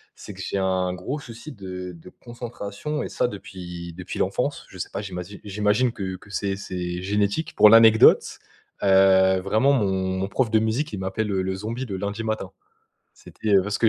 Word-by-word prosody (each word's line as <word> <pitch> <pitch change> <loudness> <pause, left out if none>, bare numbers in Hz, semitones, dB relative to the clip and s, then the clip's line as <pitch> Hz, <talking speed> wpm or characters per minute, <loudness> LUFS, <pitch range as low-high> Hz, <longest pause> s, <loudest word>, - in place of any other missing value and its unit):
C'est - - -10
que - - -9
j'ai - - -3
un 95 -1 0
gros 95 +11 -4
souci 120 +4 -10
de 90 -3 -7
de 80 - -13
concentration 120 +3 -6
et - - -3
ça 120 - 0
depuis 90 -4 -8
depuis 90 +1 -7
l'enfance. - - -1
Je - - -13
sais - - -4
pas, - - -4
j'imagi 95 0 -7
j'imagine 105 +4 +1
que 95 -3 -4
que 100 - -18
c'est 100 -1 -2
c'est 90 -2 -4
génétique. 100 - -1
Pour 105 - +8
l'anecdote, 115 0 +6 0.4
heu, 95 -1 +5
vraiment 110 +9 +2
mon 105 -8 +2 0.3
mon 95 - -1
prof 115 +2 0
de 110 - +4
musique 115 +8 -1
il 100 - -4
m'appelle 95 +3 -2
le 95 -1 -1
zombie 115 +6 -4
de 100 - -4
lundi 100 +3 -3
matin. 110 -1 -3 0.6
C'était 105 -2 -2
parce 105 +3 -2
que 115 - +3
100 Hz, 185 wpm, -24 LUFS, 95-110 Hz, 0.6 s, Pour